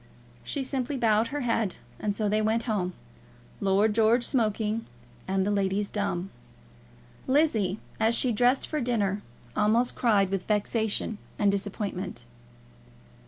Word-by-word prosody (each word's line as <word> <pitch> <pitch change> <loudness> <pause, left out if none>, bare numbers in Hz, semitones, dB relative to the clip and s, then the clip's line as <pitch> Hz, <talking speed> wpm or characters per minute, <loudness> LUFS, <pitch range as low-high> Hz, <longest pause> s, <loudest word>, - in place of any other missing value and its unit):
She 280 - -3
simply 265 +1 -2
bowed 225 -2 +3
her 290 0 -3
head. 230 -5 0 0.2
And 205 -1 -1
so 215 -1 0
they 215 +1 +2
went 220 +2 +1
home, 195 -6 -1 0.7
Lord 200 +2 +3
George 225 +2 +4
smoking, 220 -2 0 0.4
and 190 0 +1
the 205 - +1
ladies 200 0 0
dumb. 195 -3 -2 1.0
Lizzie, 235 - +2 0.2
as 225 +1 +3
she 250 +1 +2
dressed 245 +4 +2
for 305 -2 -2
dinner, 210 -5 0 0.3
almost 225 +4 +2
cried 200 -5 +2
with 195 -2 -2
vexation 215 0 0 0.2
and 205 -1 +3
disappointment. 200 -1 -4
215 Hz, 130 wpm, -27 LUFS, 200-235 Hz, 1.0 s, George